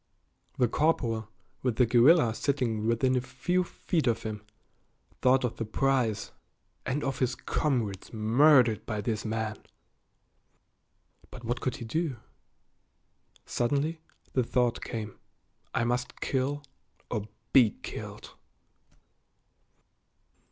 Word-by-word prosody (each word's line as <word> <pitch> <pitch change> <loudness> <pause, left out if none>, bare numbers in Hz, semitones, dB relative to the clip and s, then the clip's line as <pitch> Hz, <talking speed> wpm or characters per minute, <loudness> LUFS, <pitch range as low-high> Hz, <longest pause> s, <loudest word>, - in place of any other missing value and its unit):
The 125 - +4
corporal, 115 -7 0 0.3
with 125 -3 0
the 125 - +4
guerrilla 120 +2 +5
sitting 115 -5 -1
within 125 +3 +2
a 125 - +2
few 135 +9 0
feet 170 -3 -2
of 115 -1 +1
him, 105 -1 -5 0.8
thought 130 +1 +4
of 125 - -2
the - - -2
prize, 120 -1 0 0.6
and 135 +3 -1
of 135 -1 -2
his 130 -1 +1
comrades 115 -13 -1
murdered 120 +2 +4
by 110 -2 -2
this 110 0 -2
man. 110 -1 -2 1.7
But 125 - -11
what 120 +1 -2
could 130 - -1
he 120 - -7
do? 155 +3 -1 1.3
Suddenly 145 +6 0 0.3
the 130 - +3
thought 120 0 +1
came, 110 -3 -5 0.5
"I - - 0
must 125 +1 -2
kill 140 +2 -1 0.5
or 105 -3 -2 0.3
be 125 -5 +7
killed." - - -7
125 Hz, 115 wpm, -29 LUFS, 110-135 Hz, 1.7 s, be